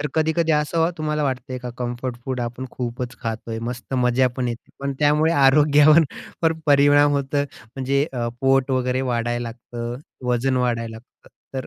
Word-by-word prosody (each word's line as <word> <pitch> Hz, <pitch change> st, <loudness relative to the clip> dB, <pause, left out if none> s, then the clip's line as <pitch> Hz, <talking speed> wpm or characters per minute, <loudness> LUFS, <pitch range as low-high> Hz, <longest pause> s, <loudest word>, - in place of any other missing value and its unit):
तर 150 Hz, -, -1 dB
कधी-कधी 160 Hz, +1 st, +2 dB
असं 160 Hz, +2 st, +2 dB
तुम्हाला 150 Hz, -1 st, -1 dB
वाटतंय 130 Hz, -1 st, -3 dB
का, 125 Hz, 0 st, -6 dB
कम्फर्ट 120 Hz, 0 st, -3 dB
फूड 130 Hz, -1 st, -3 dB
आपण 120 Hz, +2 st, -4 dB
खूपच 120 Hz, 0 st, -5 dB
खातोय, 115 Hz, 0 st, -4 dB
मस्त 125 Hz, +2 st, -6 dB
मजा 125 Hz, 0 st, +3 dB
पण 125 Hz, -2 st, -1 dB
येते, 120 Hz, 0 st, -7 dB
पण 140 Hz, 0 st, -2 dB
त्यामुळे 150 Hz, +2 st, +3 dB
आरोग्यावर 150 Hz, +2 st, +6 dB, 0.4 s
पण 165 Hz, -1 st, +2 dB
परिणाम 145 Hz, 0 st, +5 dB
होतो. 140 Hz, 0 st, 0 dB, 0.3 s
म्हणजे 135 Hz, +1 st, +1 dB
अ, 120 Hz, -2 st, -2 dB
पोट 135 Hz, 0 st, +3 dB
वगैरे 130 Hz, 0 st, 0 dB
वाढायला 120 Hz, +1 st, -1 dB
लागतं, 120 Hz, 0 st, -6 dB, 0.3 s
वजन 130 Hz, +2 st, +1 dB
वाढायला 115 Hz, -2 st, -1 dB
लागतं, 115 Hz, +3 st, -18 dB, 0.3 s
तर 130 Hz, -, -5 dB
130 Hz, 160 wpm, -22 LUFS, 120-145 Hz, 0.4 s, आरोग्यावर